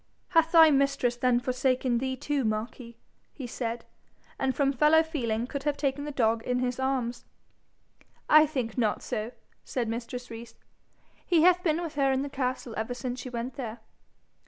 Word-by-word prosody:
'Hath 330 -1 +3
thy 325 -2 +8
mistress 275 -3 +1
then 245 0 +2
forsaken 255 0 0
thee 260 +1 -2
too, 285 +1 -2
Marquis?' 230 +2 -4 0.3
he 270 - -8
said, 235 -1 -4 0.5
and 265 -1 0
from 275 -1 +2
fellow 300 +4 +5
feeling 240 -8 -2
could 275 +2 -5
have 290 0 -1
taken 285 0 -1
the 295 - -4
dog 230 -4 +1
in 250 +2 -1
his 250 0 -2
arms. 260 -3 -1 1.0
'I 305 +1 +7
think 255 -6 -3
not 215 -3 0
so,' 225 -2 -3 0.3
said 245 -3 -3
mistress 235 +2 -5
Rees. 230 +1 -9 0.7
'He 335 -4 +3
hath 360 0 +5
been 325 -3 +1
with 330 - -5
her 275 -2 +2
in 265 +1 0
the 285 - -5
castle 255 -3 -3
ever 225 +3 -3
since 250 +1 -4
she 255 - -6
went 245 +2 -5
there.' 235 -4 -5
255 Hz, 175 wpm, -28 LUFS, 235-280 Hz, 1.0 s, thy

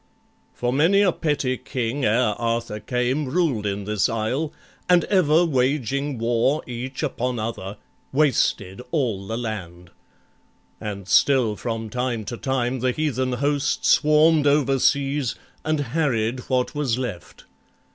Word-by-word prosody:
For 120 0 -1
many 170 +9 +4
a 195 -3 +4
petty 145 -6 -1
king 125 +3 -3
ere 115 +2 +3
Arthur 115 -2 -2
came 125 +6 -1
Ruled 130 -8 0
in 100 0 -3
this 105 -1 0
isle, 120 +8 -1 0.4
and 180 -1 +5
ever 175 -3 +3
waging 140 -1 0
war 120 +6 +1
Each 125 +2 -5
upon 125 0 -2
other, 110 -3 -5 0.3
wasted 125 -8 +1
all 115 - -1
the 115 - -3
land; 90 -7 -6 0.9
And 100 -3 -6
still 115 +3 +3
from 115 -1 -4
time 125 -3 -2
to 120 +3 -5
time 130 -1 -1
the 130 +2 +1
heathen 130 -4 -1
host 145 +3 0
Swarm'd 155 0 +4
overseas, 140 -1 +2 0.3
and 155 -1 0
harried 130 -4 0
what 130 -1 0
was 140 -6 0
left. 115 -9 -6
125 Hz, 130 wpm, -23 LUFS, 115-145 Hz, 0.9 s, and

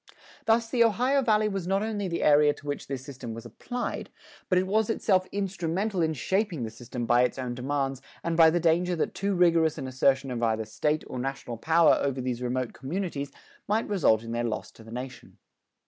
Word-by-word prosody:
Thus 230 +1 +3
the 235 0 +3
Ohio 250 +5 +2
Valley 215 -3 +3
was 195 -4 -3
not 195 +2 +1
only 210 -3 -2
the 170 -1 -2
area 150 0 +5
to - - -16
which 145 0 -4
this 135 -2 -5
system 125 -5 -7
was 115 +1 -9
applied, 240 - -5 0.4
but 185 - +3
it 185 - +2
was 215 +3 +1
itself 190 -4 +2
instrumental 195 0 -1
in 160 -1 +1
shaping 190 - -1
the 110 - -4
system 120 +1 -6
by 120 +1 +4
its 125 +1 +1
own 125 -2 -3
demands 135 +1 -2 0.2
and 170 -1 -1
by 165 -1 +7
the 175 +2 +1
danger 175 +2 +2
that 160 - -1
too 200 0 -1
rigorous 165 -3 +3
an 135 -3 -4
assertion 130 +1 +1
of 120 -1 -3
either 110 -1 +1
State 150 +8 -1
or 125 - -6
national 135 -2 -4
power 160 +6 +4
over 135 -2 -1
these 125 -1 -3
remote 125 0 -2
communities 145 0 -4 0.4
might 215 +2 +1
result 140 - +3
in 115 - -7
their 120 0 -1
loss 115 -2 -3
to 115 - -16
the 110 - -13
nation. 125 +1 -8
150 Hz, 210 wpm, -27 LUFS, 125-190 Hz, 0.4 s, by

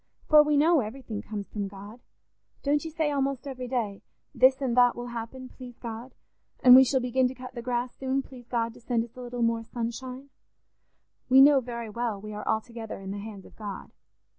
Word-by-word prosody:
For 305 -1 +8
we 300 -1 +2
know 320 +2 +5
everything 225 -2 -5
comes 205 -2 -6
from 205 -2 -4
God: 205 +4 -11 0.6
don't 290 +1 +1
you 325 - -5
say 310 -1 -1
almost 275 -1 -1
every 255 -2 -5
day, 225 -6 -2 0.3
'This 260 0 +5
and 260 -4 -1
that 245 -1 +5
will 240 0 -6
happen, 240 +2 -6
please 250 -2 -12
God,' 235 +2 -8 0.5
and 250 0 +10
'We 265 +1 +9
shall 265 +1 +2
begin 250 +1 +2
to 255 - -6
cut 255 0 -9
the 240 - -6
grass 245 0 -2
soon, 270 0 -1
please 250 -3 -13
God 230 -2 -1
to 245 - -16
send 230 -1 0
us 235 - -13
a 255 - -9
little 245 -1 -3
more 230 0 +1
sunshine'? 250 +4 -6 1.0
We 260 +1 +7
know 280 0 +8
very 235 -3 -6
well 230 -2 -2
we 215 +1 -8
are 210 - -7
altogether 225 -1 -3
in 195 0 -7
the 200 - -5
hands 205 -2 -9
of - - -16
God. 205 -3 -7
245 Hz, 210 wpm, -27 LUFS, 225-260 Hz, 1.0 s, and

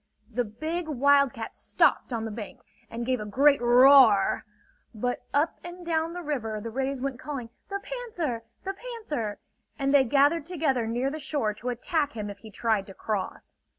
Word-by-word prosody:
The 245 +2 0
big 315 +10 -4
wildcat 280 -4 +2
stopped - - +2
on 225 -2 -2
the 220 - -4
bank, 225 +4 -8 0.3
and 235 +1 -4
gave 255 0 0
a 210 - -5
great 280 +5 +4
roar; 240 -4 +6 0.5
but 245 +3 -1
up 300 +3 +1
and 350 +1 -9
down 325 0 0
the 355 0 -6
river 230 -8 -2
the 230 +2 -6
rays 265 +2 -2
went 265 -1 -3
calling; 260 -6 -6 0.2
"The 395 0 -3
Panther! 360 - -4 0.2
The 390 - -3
Panther!" 390 - -5 0.4
and 275 -1 0
they 280 -2 +7
gathered 285 +5 +3
together 285 -9 0
near 245 +4 -1
the 310 - -5
shore 275 -7 -1
to 235 +4 -5
attack 290 +4 -1
him 210 -2 -4
if 200 - -12
he 220 - -12
tried 215 -2 0
to 195 - -11
cross. 210 -3 -4
265 Hz, 180 wpm, -27 LUFS, 230-310 Hz, 0.5 s, they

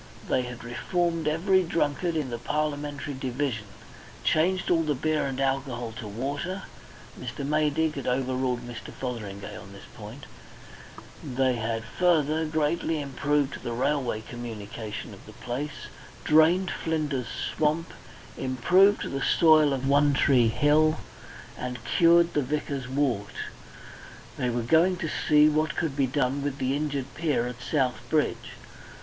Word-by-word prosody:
They 130 - +2
had 125 -1 -7
reformed 165 +7 -1
every 185 +5 +3
drunkard 165 0 0
in 145 -5 -2
the 120 - -4
Parliamentary 145 0 -2
division, 130 -3 -2 0.6
changed 180 +4 +2
all 165 -2 +4
the 150 -2 0
beer 155 +2 0
and 135 -1 -4
alcohol 135 -3 -1
to 110 - -6
water 140 - -4 0.6
(Mr. 140 - -5
Maydig 150 +1 +1
had 140 - -5
overruled 130 -1 0
Mr. 120 -1 -8
Fotheringay 105 -6 -6
on 95 +2 -10
this 100 - -12
point); 115 +4 -10 1.0
they 130 -1 +1
had, 115 0 -2
further, 160 +3 +1
greatly 155 +1 0
improved 140 0 -1
the 120 - -4
railway 130 -3 0
communication 110 -2 -7
of - - -13
the - - -11
place, 135 +5 -5 0.4
drained 165 +4 +4
Flinder's 150 -6 -2 0.3
swamp, 155 +2 0 0.5
improved 175 - +3
the 135 - -3
soil 155 -2 +5
of 135 0 -1
One 145 0 +4
Tree 125 -4 +4
Hill, 150 +6 +3 0.6
and 125 0 -4
cured 170 0 +4
the 150 - +2
vicar's 140 -1 -3
wart. 130 -7 -1 1.0
And - - -2
they - - +1
were 120 0 -1
going 165 +8 +4
to 160 - -3 0.2
see 150 0 +7
what 155 0 +1
could 160 -5 -1
be 140 -2 +2
done 135 +1 0
with 140 -1 -3
the 130 0 0
injured 140 -3 -3
pier 150 -7 0
at 125 0 -6
South 130 -2 0
Bridge. 155 -2 0
140 Hz, 145 wpm, -27 LUFS, 125-155 Hz, 1.0 s, see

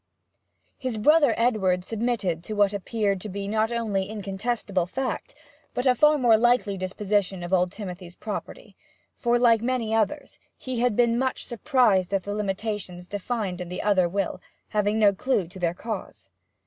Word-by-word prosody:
His 255 -4 -3
brother 290 +2 +5
Edward 195 -7 +2
submitted 210 -6 -1
to 215 - -4
what 205 -1 +3
appeared 200 -1 -1
to 210 - -6
be 200 +1 -4
not 220 +2 +1
only 205 -5 -1
incontestible 200 -2 -2
fact, 260 +7 -4 0.4
but 250 - -1
a 255 - +6
far 300 +4 +4
more 240 -5 +5
likely 240 -3 +2
disposition 190 0 -1
of 175 +2 -4
old 180 -1 +3
Timothy's 180 -3 -8
property; 210 - -7 0.4
for, 240 0 +1
like 235 -2 +4
many 235 -2 -1
others, 225 +7 -1 0.2
he 255 -2 -4
had 245 -3 +2
been 235 0 +3
much 260 0 -1
surprised 235 -7 +2
at 190 - -1
the 205 - -4
limitations 200 -3 -3
defined 205 -2 -3
in 175 - -6
the 180 - -4
other 190 -4 +3
will, 195 +1 -2 0.3
having 210 0 +1
no 205 -2 +5
clue 200 -3 0
to 185 +2 -11
their 175 -1 0
cause. 210 - -6
210 Hz, 165 wpm, -25 LUFS, 190-235 Hz, 0.4 s, a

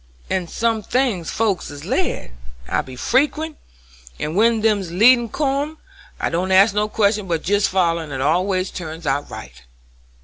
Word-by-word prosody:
"In 185 -2 0
some 225 +3 0
things 220 -7 0
folks 215 -5 -1
is 145 0 -9
led; - - -2 0.4
I - - 0
be 130 - -11
frequent, 295 - 0 0.6
and 155 +2 -3
when 225 +2 +3
them 215 -2 +2
leadin's 225 +7 +4
come 290 +2 -1 0.4
I - - -1
don't 180 +3 -1
ask 195 +2 +6
no 210 +1 0
questions 210 -1 +1
but 165 -2 -1
jest 205 +2 +2
foller, 170 -3 +1
and 150 - -10
it 135 - -4
always 185 +6 +1
turns 165 -1 -7
out 140 +1 -1
right." 65 +1 -10
195 Hz, 165 wpm, -20 LUFS, 165-230 Hz, 0.6 s, ask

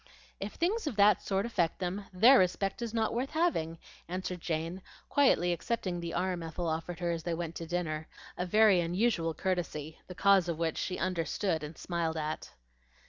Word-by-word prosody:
"If 200 +2 -5
things 370 +3 0
of 255 - -2
that 205 +1 +5
sort 195 +1 0
affect 175 -8 0
them, 190 +2 -3
their 230 +9 +7
respect 190 +3 0
is 235 -2 -3
not 225 -1 0
worth 250 +4 -1
having," 310 - 0 0.3
answered 180 0 -4
Jane, 165 +3 -3 0.3
quietly 180 -11 +4
accepting 180 0 -2
the 170 -1 -4
arm 185 -1 -1
Ethel 165 +1 -4
offered 165 +2 -3
her 175 -1 0
as 165 -1 -2
they 170 +1 -2
went 165 -1 -4
to 165 - -6
dinner, 160 -3 -2 0.3
a 180 - -3
very 210 -1 +5
unusual 170 -2 +1
courtesy, 165 -4 -3
the 180 - -8
cause 195 -2 +4
of 165 - -1
which 165 -1 -1
she 180 - -2
understood 170 -1 -1
and 150 +1 -7
smiled 170 -2 -2
at. 155 0 -4
180 Hz, 185 wpm, -31 LUFS, 165-200 Hz, 0.3 s, their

